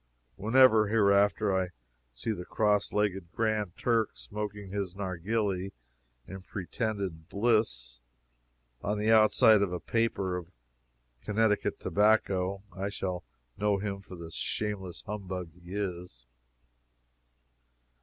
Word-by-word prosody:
Whenever, 110 Hz, 0 st, +5 dB
hereafter, 100 Hz, -2 st, +3 dB
I 95 Hz, -1 st, +1 dB, 0.4 s
see -, -, -3 dB
the 90 Hz, -5 st, -4 dB
cross 105 Hz, +1 st, +1 dB
legged 95 Hz, -4 st, -1 dB
Grand 110 Hz, -5 st, -1 dB
Turk 115 Hz, -3 st, +2 dB
smoking 105 Hz, -2 st, -6 dB
his 100 Hz, -3 st, -3 dB
narghili, 95 Hz, 0 st, -2 dB, 0.5 s
in 95 Hz, 0 st, -8 dB
pretended 95 Hz, -3 st, -4 dB
bliss, 100 Hz, -, +1 dB, 0.8 s
on 105 Hz, +2 st, -1 dB
the 105 Hz, +2 st, +2 dB
outside 110 Hz, 0 st, +6 dB
of 100 Hz, -3 st, +1 dB
a 90 Hz, -, -2 dB
paper 100 Hz, -5 st, 0 dB
of 90 Hz, -1 st, -8 dB, 0.7 s
Connecticut 105 Hz, 0 st, +1 dB
tobacco, 100 Hz, -2 st, +2 dB
I 100 Hz, +1 st, -2 dB
shall 90 Hz, -3 st, -3 dB, 0.4 s
know 105 Hz, -1 st, +2 dB
him 100 Hz, 0 st, -4 dB
for 95 Hz, -, -11 dB
the 85 Hz, -1 st, -9 dB
shameless 95 Hz, -1 st, -3 dB
humbug 95 Hz, -4 st, -5 dB
he 90 Hz, +2 st, -10 dB
is. 90 Hz, -11 st, -4 dB
100 Hz, 115 wpm, -30 LUFS, 90-105 Hz, 0.8 s, outside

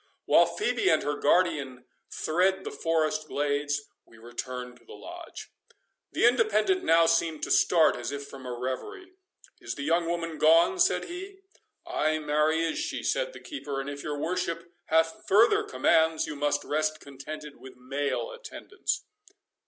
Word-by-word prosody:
While -, -, +5 dB
Phœbe 415 Hz, -2 st, +2 dB
and -, -, +2 dB
her 145 Hz, +1 st, -1 dB
guardian 145 Hz, -5 st, +1 dB, 0.2 s
thread 185 Hz, +4 st, +1 dB
the -, -, -5 dB
forest 155 Hz, -1 st, 0 dB
glades, 145 Hz, 0 st, -1 dB, 0.2 s
we 115 Hz, -, -20 dB
return 125 Hz, +2 st, -7 dB
to -, -, -22 dB
the 440 Hz, -, -12 dB
Lodge. -, -, -10 dB, 0.6 s
The -, -, +2 dB
Independent 240 Hz, -, +3 dB
now 165 Hz, 0 st, +5 dB
seemed 165 Hz, -2 st, +1 dB
to -, -, -2 dB
start 165 Hz, -3 st, +4 dB
as 120 Hz, +2 st, -4 dB
if 140 Hz, 0 st, -5 dB
from 135 Hz, -2 st, -10 dB
a -, -, -4 dB
reverie. 130 Hz, -, -5 dB, 0.5 s
"Is -, -, -5 dB
the 140 Hz, -, -5 dB
young 165 Hz, +3 st, +1 dB
woman 165 Hz, -2 st, -3 dB
gone?" 165 Hz, -, +5 dB
said 365 Hz, +3 st, +3 dB
he. 385 Hz, +2 st, -8 dB, 0.4 s
"Ay, 155 Hz, +1 st, 0 dB
marry 155 Hz, +2 st, +1 dB
is 165 Hz, -, -1 dB
she," -, -, -3 dB
said -, -, -1 dB
the -, -, -10 dB
keeper; 145 Hz, -, -5 dB
"and 135 Hz, +1 st, -4 dB
if 140 Hz, 0 st, -7 dB
your 150 Hz, 0 st, -4 dB
worship 170 Hz, +1 st, -3 dB
hath 160 Hz, 0 st, +1 dB
farther 230 Hz, -, +5 dB
commands, 160 Hz, -, +2 dB
you 150 Hz, -, -6 dB
must 145 Hz, 0 st, 0 dB
rest 155 Hz, +1 st, -1 dB
contented 145 Hz, +2 st, -9 dB
with 130 Hz, -, -13 dB
male 140 Hz, -, -3 dB
attendance." 475 Hz, -3 st, -5 dB
155 Hz, 160 wpm, -28 LUFS, 145-185 Hz, 0.6 s, While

